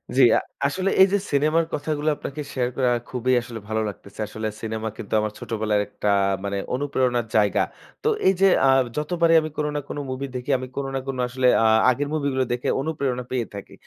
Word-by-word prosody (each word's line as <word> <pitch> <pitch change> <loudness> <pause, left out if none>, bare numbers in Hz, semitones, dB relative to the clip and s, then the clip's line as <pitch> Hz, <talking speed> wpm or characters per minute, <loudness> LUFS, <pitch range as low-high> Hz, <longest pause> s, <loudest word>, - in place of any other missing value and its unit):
জ্বী। 135 - +6
আ - - +3 0.3
আসলে 185 +7 -1
এই 190 - +9
যে - - +5
cinema 150 +3 +2
র - - -6
কথাগুলো 150 +1 -1
আপনাকে 145 +1 -6
share 125 -2 0
করে 130 - +1
আমার 120 -1 -1
খুবই 130 0 0
আসলে 115 -1 -8
ভালো 110 0 0
লাগতেছে। 100 0 -12
আসলে 110 +1 -4
cinema 110 0 -3
কিন্তু 100 - -7
আমার 105 0 -2
ছোটবেলার 110 -2 0
একটা 105 0 -3 0.3
মানে 100 0 -2 0.2
অনুপ্রেরণার 125 -3 0
জায়গা। 105 -2 +3 0.4
তো - - +1 0.2
এই 190 - +6
যে 195 - +7 0.2
আ - - +5 0.3
যতবারই 165 +2 +2
আমি 155 - -4
কোন 150 - 0
না - - +1
কোন - - -5
movie 130 +1 -4
দেখি 125 0 -5
আমি 130 0 -6
কোন 140 - -2
না - - 0
কোন 135 -1 -3
আসলে 130 +1 +1 0.2
আ - - +4 0.2
আগের 140 +3 0
movie 145 -2 0
গুলো 130 0 +1
দেখে 120 - -2
অনুপ্রেরণা 135 -5 -2
পেয়ে 125 -2 0
থাকি। 100 - -9
130 Hz, 210 wpm, -23 LUFS, 115-145 Hz, 0.4 s, এই